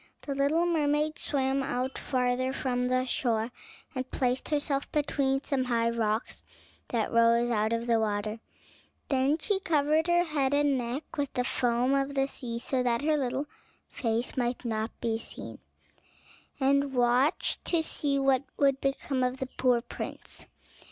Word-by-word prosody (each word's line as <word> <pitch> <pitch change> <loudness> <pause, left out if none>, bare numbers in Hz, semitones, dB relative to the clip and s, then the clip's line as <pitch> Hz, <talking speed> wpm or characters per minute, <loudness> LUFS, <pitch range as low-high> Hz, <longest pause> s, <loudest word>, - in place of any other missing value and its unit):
The 280 - -3
little 285 +5 +2
mermaid 305 -2 +1
swam 270 -1 0
out 260 -1 -2
farther 255 0 0
from 250 -2 -1
the 255 0 +1
shore 235 -2 0 0.4
and 255 -1 -4
placed 255 0 -1
herself 290 -2 -1
between 275 -2 0
some 265 -2 0
high 230 -2 +1
rocks 220 -1 -1 0.4
that 230 -3 -1
rose 230 +1 +4
out 215 -1 +1
of 230 0 -1
the 230 -1 +3
water; 215 0 -1 0.7
then 270 +2 +2
she 385 +4 0
covered 310 -1 +2
her 345 0 +4
head 285 -4 0
and 290 -1 +3
neck 250 +4 -2
with 285 -2 -1
the 250 - +1
foam 245 +1 +1
of 275 0 0
the 270 0 +3
sea 245 -4 -5
so 255 +2 -1
that 245 +1 +1
her 310 0 +3
little 270 0 -1 0.4
face 230 0 -1
might 245 -1 -1
not 220 -1 -1
be 225 -1 0
seen, - - -8 1.0
and 275 0 +2
watched 250 +5 +2
to 335 -2 +2
see 285 -3 0
what 270 -2 +3 0.2
would 275 -1 +3
become 275 -1 -1
of 250 +1 0
the 265 -1 -4
poor 250 -2 +3
prince. 240 - -7
260 Hz, 160 wpm, -29 LUFS, 240-280 Hz, 1.0 s, rose